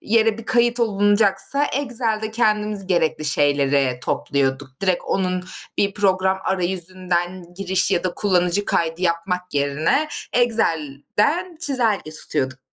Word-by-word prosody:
yere 225 0 +2
bir 230 - -8
kayıt 240 0 +2
olunacaksa 205 +4 +2
Excel'de 230 -6 -1
kendimiz 210 -3 0
gerekli 160 -4 0
şeyleri 140 -3 +2
topluyorduk. 135 0 -1
Direkt 185 -2 +1
onun 185 -1 -1 0.3
bir 200 0 +1
program 190 -2 +1
arayüzünden 180 -1 -2
giriş 190 0 +1
ya 185 -1 +1
da 180 - -1
kullanıcı 185 -1 +1
kaydı 165 -2 -1
yapmak 180 0 -1
yerine, 150 - +1 0.2
Excel'den 225 - 0
çizelge 235 - +1
tutuyorduk 130 -4 -3
185 Hz, 115 wpm, -21 LUFS, 165-215 Hz, 0.3 s, yere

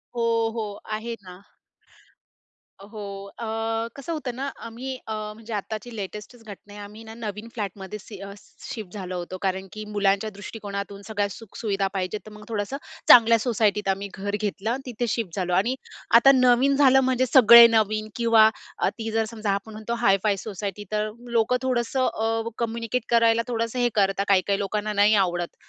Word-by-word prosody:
हो, 230 -1 +1
हो. 215 -3 -3 0.2
आहे 225 +2 -4
ना. 180 0 -12 1.4
अ, 195 - -12
हो, 215 -2 -8 0.4
अ, 230 - -4 0.5
कसं 280 +5 -6
होतं 270 -5 -4
ना, 275 +2 -3 0.2
आम्ही 255 +3 -6
अ, 220 - -3 0.2
म्हणजे 225 +1 -9
आत्ताची 215 +3 -5
लेटेस्टच 210 +4 -7
घटना 205 -1 -12
आहे 205 - -9
आम्ही 210 +2 -11
ना 220 0 -10
नवीन 215 -1 -6
फ्लॅटमध्ये 200 -1 -5
सि 210 0 -11
अ, 200 0 -7 0.3
शिफ्ट 220 -9 -7
झालो 185 -3 -5
होतो 175 +1 -6
कारण 190 0 -1
की, 215 0 -7
मुलांच्या 200 +1 +2
दृष्टिकोनातून 200 -1 -7
सगळ्या 205 -2 0
सुखसुविधा 200 -1 -3
पाहिजेत 190 +2 -2
तर 215 - -11
मग 210 0 -12
थोडंसं 215 +4 -3 0.3
चांगल्या 230 -1 +9
सोसायटीत 210 -3 +1
आम्ही 195 +1 -1
घर 200 +1 -3
घेतलं 210 0 -2
आणि 255 +3 -1
तिथे 240 -1 -3
शिफ्ट 215 -6 -2
झालो 180 -2 -1
आणि 210 +8 +2 0.4
आता 270 +3 +7
नवीन 255 +1 +4
झालं, 270 -1 +6
म्हणजे 260 -1 +2
सगळे 235 -3 +10
नवीन 215 -1 +1
किंवा 230 -2 +5 0.3
अ, - - +1
ती 225 -1 -6
जर 225 0 +1
समजा 215 -2 -1
आपण 200 +3 -3
म्हणतो, 215 +2 -5
हाय-फाय 205 -3 +2
सोसायटी, 200 0 -5
तर 215 0 0 0.3
लोकं 230 +2 +3
थोडंसं 255 0 0
अ, 225 +1 -1
कम्युनिकेट 230 +1 -2
करायला 230 -1 +4
थोडंसं 230 0 -2
हे 245 0 +3
करतात 195 -1 +2
काही-काही 195 0 +2
लोकांना 210 +1 -2
नाही 205 +1 +4
आवडत. 175 -3 0
215 Hz, 175 wpm, -25 LUFS, 200-235 Hz, 1.4 s, सगळे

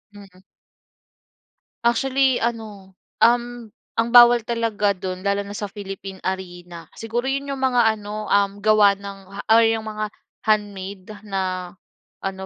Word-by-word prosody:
Mm. 195 -2 -15 1.5
Actually, 265 +2 +2
ano, 215 -5 -4 0.3
um, 240 -1 +2 0.3
ang 230 +1 +1
bawal 240 0 +8
talaga 225 -3 0
do'n 185 0 -5
lalo 200 0 +1
na 200 - -8
sa 205 - -4
Philippine 195 -1 -8
Arena, 175 -2 -5
siguro 230 +2 -3
'yon 275 +1 -2
yung 270 - -6
mga 240 -4 +3
ano, 210 +1 -6
um, 200 0 +1
gawa 210 -1 +5
ng 200 0 -9 0.3
or 230 +1 +6
yung 225 -1 0
mga 215 0 -3 0.4
handmade 200 -3 -1 0.2
na 185 -3 -3 0.5
ano 190 0 -4
210 Hz, 130 wpm, -22 LUFS, 195-230 Hz, 1.5 s, bawal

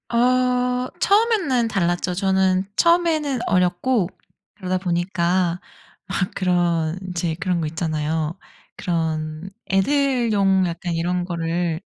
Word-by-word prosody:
어 250 +1 +2
처음에는 395 - +2
달랐죠. 180 -3 0
저는 190 0 +2
처음에는 325 -5 +2
어렸고 180 +3 +1 0.5
그러다 185 -3 -2
보니까 175 0 0 0.5
막 185 -1 -1
그런 175 -2 +1
이제 170 -2 -2
그런 180 -3 0
거 155 - -1
있잖아요. 155 0 -2 0.4
그런 160 0 -2 0.2
애들용 210 -4 +2
약간 170 +1 -4
이런 175 +2 -1
거를 170 -1 -2
185 Hz, 230 characters per minute, -22 LUFS, 170-235 Hz, 0.5 s, 어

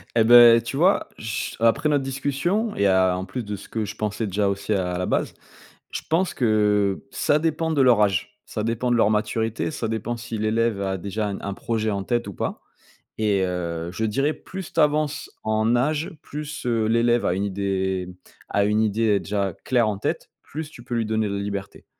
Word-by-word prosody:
Eh 115 - +5
beh, 120 0 +8
tu 120 - -5
vois? 180 +7 +3
Ch 110 -5 -4
après 115 +7 +3
notre 145 -2 +2
discussion 145 - -1
et 100 - +2
à 95 -1 +3
en 95 +1 -4
plus 100 +6 -5
de 105 -1 -4
ce - - -12
que 110 -2 -2
je 105 +2 -7
pensais 105 +1 -2
déjà 100 0 0
aussi 100 +2 -2
à 90 -2 -1
la 90 - -1
base. - - -1 0.6
Je - - -4
pense 175 +3 +1
que 105 -4 +2
ça 145 - +1
dépend 160 +1 0
de 145 - +2
leur 125 -4 +5
âge, 95 -5 0
ça 105 - -4
dépend 115 +2 -1
de 120 - +4
leur 105 - +4
maturité, 110 +4 -1
ça 115 -6 -3
dépend 115 +2 -3
si 115 -1 -6
l'élève 110 0 +1
a 95 -1 -1
déjà 100 +3 -3
un 100 -1 -4
un 100 - -4
projet 110 0 -1
en 100 -2 -2
tête 120 +3 -1
ou 100 - -6
pas, - - -3 0.6
et 105 -3 +1
heu, 85 -2 -3
je 110 - -3
dirais 135 +8 +1
plus 190 -2 -9
tu - - -1
avances 150 0 +1
en 110 +2 +1
âge, 150 +5 0
plus, 150 -1 -7
heu, 115 -3 +1
l'élève 120 +1 +2
a 90 - +2
une 100 +2 -1
idée 95 -2 -1 0.4
a 100 - +2
une 105 +1 +2
idée 110 -1 +2
déjà 100 -2 -2
claire 120 -4 +2
en 105 -2 -1
tête, - - -3
plus 155 0 -6
tu 120 -6 -13
peux 120 -1 -4
lui 115 - 0
donner 110 -1 0
de 100 - -2
liberté. 100 -1 -5
110 Hz, 210 wpm, -24 LUFS, 100-125 Hz, 0.6 s, beh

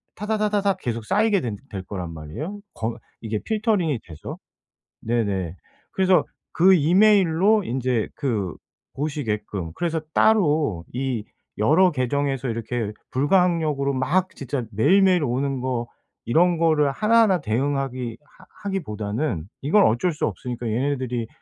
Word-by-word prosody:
타다다다닥 210 -2 0
계속 115 -7 -4
쌓이게 210 - +2
된 115 -6 -4
될 95 -3 -4
거란 90 -3 -6
말이에요 85 - -6 0.2
거 115 +1 -3 0.2
이게 110 -1 -2
필터링이 210 - 0
돼서. 80 -3 -8 0.6
네네. 100 -7 -1 0.4
그래서 190 -1 +3 0.3
그 190 +3 +6
이메일로 190 +3 +4
인제 125 -4 -1
그 105 - -2 0.4
보시게끔. 110 - -3
그래서 165 -2 -1
따로 150 - +3
이 125 -3 -2 0.3
여러 160 - +4
계정에서 135 0 -1
이렇게 115 -1 -3 0.2
불가항력으로 150 -2 +2
막 175 +9 +1
진짜 135 -1 -4
매일매일 185 - +4
오는 135 +1 -1
거 125 -2 -2 0.4
이런 170 +8 +3
거를 155 -3 +3
하나하나 215 +1 +3
대응하기 130 -1 -2
하 150 - -21 0.2
하기보다는 110 - -2 0.2
이건 185 +9 +4
어쩔 125 +11 +1
수 150 - -1
없으니까 120 -1 -5
얘네들이 125 -1 -1
140 Hz, 295 characters per minute, -23 LUFS, 115-180 Hz, 0.6 s, 그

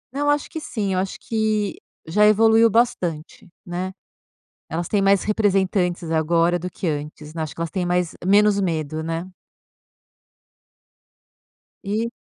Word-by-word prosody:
É, - - -2
eu 290 - +2
acho 290 0 +1
que 320 - -5
sim, 205 -8 -2
eu 185 - +1
acho 190 0 -3
que 215 -2 -1 0.3
já 210 +6 +4
evoluiu 225 +2 +5
bastante, 185 -9 -1 0.2
né. 180 +1 -4 0.8
Elas 165 +2 -3
têm 205 - +1
mais 195 0 +3
representantes 190 -5 +1
agora 165 +2 +2
do 180 - -5
que 180 - -5
antes, 150 0 -5
né, 165 - -4
acho 155 - -7
que 165 - -6
elas 165 - -2
têm 185 -3 -2
mais 175 -1 0
menos 205 +1 +4
medo, 160 -4 -2
né. 165 +2 -3 2.6
E 215 +3 -1
185 Hz, 145 wpm, -22 LUFS, 165-210 Hz, 2.6 s, evoluiu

